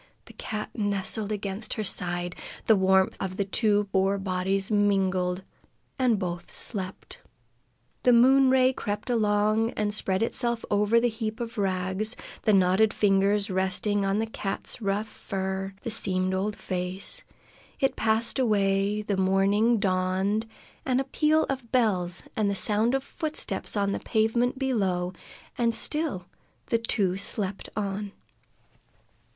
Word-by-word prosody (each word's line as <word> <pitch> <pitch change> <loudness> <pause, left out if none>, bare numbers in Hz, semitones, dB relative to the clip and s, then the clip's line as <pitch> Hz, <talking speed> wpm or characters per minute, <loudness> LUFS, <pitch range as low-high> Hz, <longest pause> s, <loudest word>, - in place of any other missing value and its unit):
The - - -14
cat 215 -1 -5
nestled 205 0 0
against 200 +1 -4
her 215 - -2
side; 175 -2 -2 0.3
the 220 - +6
warmth 190 -1 +3
of 185 -1 -4
the 200 - 0
two 205 0 +2
poor 195 +1 +2
bodies 190 +1 -1
mingled, 190 -3 +1 0.6
and 245 -4 +3
both 175 -2 -4
slept. 190 -4 -5 0.8
The 250 - +4
moon 260 +3 +6
ray 260 0 +4
crept 210 +1 -3
along 215 0 +2
and 210 -1 -1
spread 195 -1 0
itself 235 0 -1
over 210 +3 +3
the 240 - +2
heap 220 0 -4
of 235 -1 -5
rags, 190 +3 0 0.3
the 215 - +2
knotted 195 +2 +3
fingers 200 0 +2
resting 190 +2 +1
on 195 +1 +1
the 220 - 0
cat's 220 +1 -5
rough 200 +1 0
fur, 190 -1 -4
the 230 - -3
seamed 185 -3 +1
old 200 +3 -1
face; 185 - -4 0.6
it 270 - +1
passed 225 +4 0
away, 205 -2 +1
and 200 -2 0
morning 200 +5 +3
dawned, 190 +2 0 0.4
with 255 -1 +1
a - - +1
peal 305 +3 +2
of 260 -4 -5
bells 190 -8 +1
and 210 -2 +1
the 200 - -1
sound 215 +5 +2
of 270 - -1
footsteps 310 -8 -3
on 200 -1 +1
the - - -2
pavement 235 +3 +1
below, 190 -9 0 0.5
and 230 -1 +2
still 290 - 0 0.5
the 230 - +3
two 195 -5 0
slept 200 0 -1
on. 200 0 -3
205 Hz, 140 wpm, -27 LUFS, 190-225 Hz, 0.8 s, the